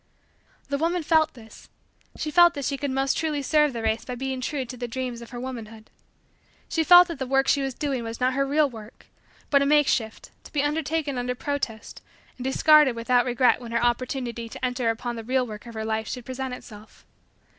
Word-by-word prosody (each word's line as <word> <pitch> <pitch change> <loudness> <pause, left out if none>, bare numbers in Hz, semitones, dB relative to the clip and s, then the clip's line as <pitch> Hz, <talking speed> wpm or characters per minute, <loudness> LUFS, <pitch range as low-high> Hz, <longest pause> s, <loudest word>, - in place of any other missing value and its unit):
The 280 0 -1
woman 340 +2 0
felt 315 -1 +2
this 225 -2 -15 0.5
she 305 - -3
felt 345 +1 +6
that 280 -2 -4
she 280 - -1
could 285 +1 -3
most 270 +1 0
truly 300 -3 -1
serve 300 +1 +3
the 230 -2 -5
race 220 +1 0
by 250 - -6
being 260 +1 -4
true 265 0 -2
to 250 - -8
the 245 0 -5
dreams 245 0 -4
of 235 - -10
her 245 - -7
womanhood. 225 -4 -8 0.8
She 325 - 0
felt 355 +2 +8
that 335 -5 -7
the 265 - -3
work 270 +1 +2
she 280 - +3
was 270 -2 -3
doing 275 -5 -2
was 225 0 -6
not 255 +1 +1
her 275 +1 +1
real 290 +2 +2
work 225 -3 -12 0.5
but 280 -1 +5
a - - +2
makeshift 275 -7 +1
to - - -14
be 290 -2 0
undertaken 300 -2 -1
under 250 0 -2
protest 250 -5 -4 0.4
and 250 - -7
discarded 295 0 +5
without 245 +1 +2
regret 250 0 +2
when 235 -1 -8
her 235 - +1
opportunity 240 -1 -2
to 255 - -5
enter 250 -2 -1
upon 235 +1 -3
the 225 - -6
real 255 +2 +1
work 215 0 -9
of 235 - -10
her 220 0 -4
life 220 0 -2
should 250 -2 -6
present 260 0 -4
itself. 215 -3 -14
255 Hz, 215 wpm, -25 LUFS, 235-285 Hz, 0.8 s, felt